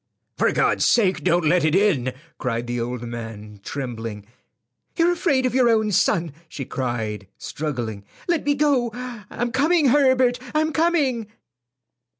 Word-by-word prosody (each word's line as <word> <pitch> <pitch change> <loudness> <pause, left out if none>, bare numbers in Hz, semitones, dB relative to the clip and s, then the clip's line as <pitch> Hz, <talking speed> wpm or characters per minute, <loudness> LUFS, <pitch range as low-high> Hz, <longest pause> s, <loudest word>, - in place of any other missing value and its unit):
"For - - +2
God's - - +2
sake 195 -6 +3
don't 175 -1 +2
let 170 +1 +3
it 155 +1 +2
in," 170 -11 +2 0.3
cried 120 -1 -2
the 120 0 -3
old 120 0 -4
man, 110 -3 -8
trembling. 115 -6 -5 0.7
"You're 340 +1 +3
afraid 290 -7 +1
of 255 - 0
your 250 -2 +4
own 220 -2 +2
son," 170 -4 +1 0.2
she 135 - -6
cried, 110 -7 -3
struggling. 120 -9 -4 0.2
"Let 340 -3 +1
me 290 0 +1
go. 275 -5 +2 0.4
I'm 240 0 -3
coming, 295 +3 +3
Herbert; 260 -2 +3 0.2
I'm 310 0 +1
coming." 280 -8 +1
180 Hz, 145 wpm, -23 LUFS, -, 0.7 s, your